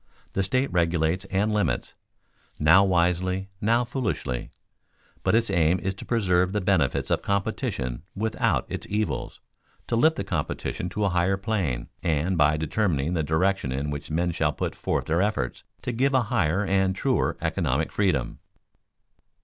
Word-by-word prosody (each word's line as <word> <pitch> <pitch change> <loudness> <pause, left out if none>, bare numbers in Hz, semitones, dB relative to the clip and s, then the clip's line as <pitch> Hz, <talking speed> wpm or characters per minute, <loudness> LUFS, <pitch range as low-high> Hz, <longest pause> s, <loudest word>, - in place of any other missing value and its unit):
The 95 - +1
state 130 +6 0
regulates 85 +1 +1
and 100 +3 0
limits 105 -4 0 0.6
now 85 +6 +6
wisely, 90 +1 +1
now 115 +3 +3
foolishly; 115 - -3 0.7
but - - +2
its 115 -3 +2
aim 85 0 +3
is 95 +1 -2
to 95 - -10
preserve 90 -5 +2
the 105 - +1
benefits 90 -8 +1
of - - +2
competition 70 -10 -2
without 110 +2 0
its - - -5
evils, 105 +1 -2 0.4
to 120 - -1
lift 160 +7 +4
the - - -3
competition 90 -1 -3
to 105 +3 -1
a - - +2
higher 90 +2 +1
plane, 95 - -2
and, 85 +3 0
by 75 -1 +3
determining 80 -1 0
the 85 - +1
direction 80 0 +1
in 70 +3 -2
which 75 - -6
men 85 +3 0
shall 80 -3 0
put - - -3
forth - - -2
their 80 +3 +1
efforts, 105 +1 -1 0.2
to - - -2
give 135 +4 +1
a 130 - +5
higher 95 -1 +2
and 95 -1 +2
truer 130 -3 0
economic 80 -3 0
freedom. 75 -12 0
95 Hz, 155 wpm, -26 LUFS, 80-100 Hz, 0.7 s, now